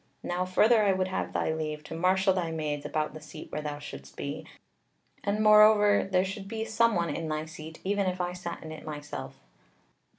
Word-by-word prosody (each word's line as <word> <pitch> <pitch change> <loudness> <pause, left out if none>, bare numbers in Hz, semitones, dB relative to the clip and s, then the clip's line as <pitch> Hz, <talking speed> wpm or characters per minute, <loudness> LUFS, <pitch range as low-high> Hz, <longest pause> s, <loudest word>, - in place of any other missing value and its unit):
Now, 180 +1 -1
further, 215 +5 +4
I 200 -2 +4
would 185 0 0
have 185 - -2
thy 160 - 0
leave 155 -1 -4
to 155 - -8
marshal 190 +3 +3
thy 180 -3 -1
maids 150 -3 -3
about 155 0 -1
the 155 - -9
seat 155 +1 -10
where 150 - -3
thou 150 -1 -4
shouldest 70 - -10
be, - - -5 0.8
and 205 +2 0
moreover 210 -1 +6
there 185 0 +3
should 195 +1 -6
be 220 +1 -3
someone 220 -7 +2
in 165 - -3
thy 155 0 -2
seat, 160 0 -10
even 200 0 0
if 185 0 -2
I 180 0 -1
sat 180 -1 -6
in 160 - -7
it 155 - -8
myself." 145 - -7
180 Hz, 200 wpm, -29 LUFS, 155-200 Hz, 0.8 s, moreover